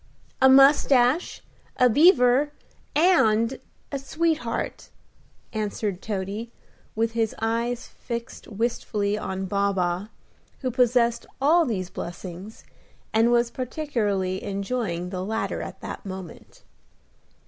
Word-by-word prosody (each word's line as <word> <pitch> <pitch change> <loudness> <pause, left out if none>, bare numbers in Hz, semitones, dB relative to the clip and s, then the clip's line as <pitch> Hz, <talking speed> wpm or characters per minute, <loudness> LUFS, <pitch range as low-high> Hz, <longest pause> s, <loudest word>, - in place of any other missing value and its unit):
"A 265 - +7
mustache, 270 +1 +4 0.3
a 250 - +6
beaver, 270 - +5 0.4
and 260 -8 +3 0.3
a 280 - -2
sweetheart," 300 -4 -2 0.6
answered 210 -3 -3
Toady, 210 +3 -4 0.4
with 225 +1 +1
his 225 -1 -1
eyes 230 +2 -1
fixed 235 -1 -7
wistfully 210 -2 -1
on 190 -2 -4
Baa 200 +1 +1
baa, 180 +1 -1 0.5
who 255 -2 -1
possessed 240 -1 +2
all 315 +4 +4
these 185 -6 -3
blessings, 180 +4 -8 0.5
and 225 +2 +4
was 235 0 +2
particularly 215 -9 -2
enjoying 195 -3 -3
the 185 -1 -3
latter 220 +3 -2
at - - -8
that - - -7
moment. 190 -4 -9
230 Hz, 105 wpm, -25 LUFS, 200-255 Hz, 0.6 s, A